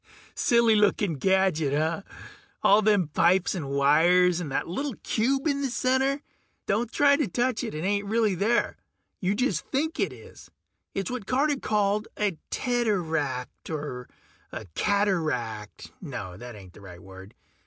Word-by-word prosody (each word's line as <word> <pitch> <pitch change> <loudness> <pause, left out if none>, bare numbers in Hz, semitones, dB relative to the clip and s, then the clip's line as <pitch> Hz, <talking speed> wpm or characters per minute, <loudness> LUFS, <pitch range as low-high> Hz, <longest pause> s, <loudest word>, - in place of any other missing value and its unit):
Silly 235 -2 +3
looking 205 -3 +2
gadget, 165 -2 +1
huh? 160 +4 0 0.6
All 205 +2 +6
them 205 -6 +2
pipes 175 +4 +2
and 155 -7 -4
wires 165 +6 +4
and 160 -6 -5
that - - -1
little 265 +9 -3
cube 270 +6 0
in 280 -2 0
the 275 - -1
center... 265 +3 0 0.4
don't 220 +3 0
try 285 -1 +4
to 290 -4 0
touch 245 +5 -1
it, - - -5
it 155 - -4
ain't 200 +1 0
really 220 -1 +2
there. 210 +6 0 0.4
You 190 +2 0
just 205 - 0
think 315 +4 -2
it - - +1
is. - - -14 0.5
It's 195 +1 -2
what 245 -6 -5
Carter 285 +2 +1
called 210 -1 0
a 205 -4 0
teteract, 165 - -2
or 145 -5 -5 0.4
a - - -7
cataract... 155 - -1
no, 125 - -6
that 120 +4 -9
ain't 95 -3 -13
the - - -15
right 90 -3 -11
word. 95 +2 -13
195 Hz, 155 wpm, -26 LUFS, 150-235 Hz, 0.6 s, All